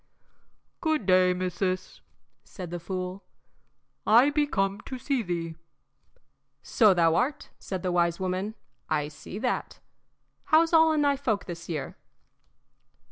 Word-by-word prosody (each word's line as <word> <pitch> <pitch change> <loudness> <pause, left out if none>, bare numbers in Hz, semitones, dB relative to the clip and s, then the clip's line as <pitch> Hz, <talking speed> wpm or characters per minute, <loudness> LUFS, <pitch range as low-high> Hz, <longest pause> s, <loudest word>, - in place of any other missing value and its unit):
"Good 315 - 0
day, 185 -1 +5
missis," 185 +1 -2 0.4
said 180 -3 -9
the 175 - -4
fool. 185 +2 -5 0.8
"I 240 +7 +6
be 295 0 +1
come 195 -4 -1
to 260 - -6
see 265 0 -1
thee." 170 -4 -3 1.1
"So 210 -5 +4
thou 165 -2 +4
art," 255 - -1
said 190 -2 -5
the 180 - 0
wise 170 -1 +1
woman; 190 +3 -2 0.3
"I 150 -2 0
see 155 +5 -9
that. 245 +3 -2 0.7
How's 330 +2 +4
all 320 0 +6
in 305 -1 +2
thy 285 -1 +2
folk 220 -7 -1
this 170 -2 -8
year?" 155 -4 -4
190 Hz, 135 wpm, -27 LUFS, 175-255 Hz, 1.1 s, I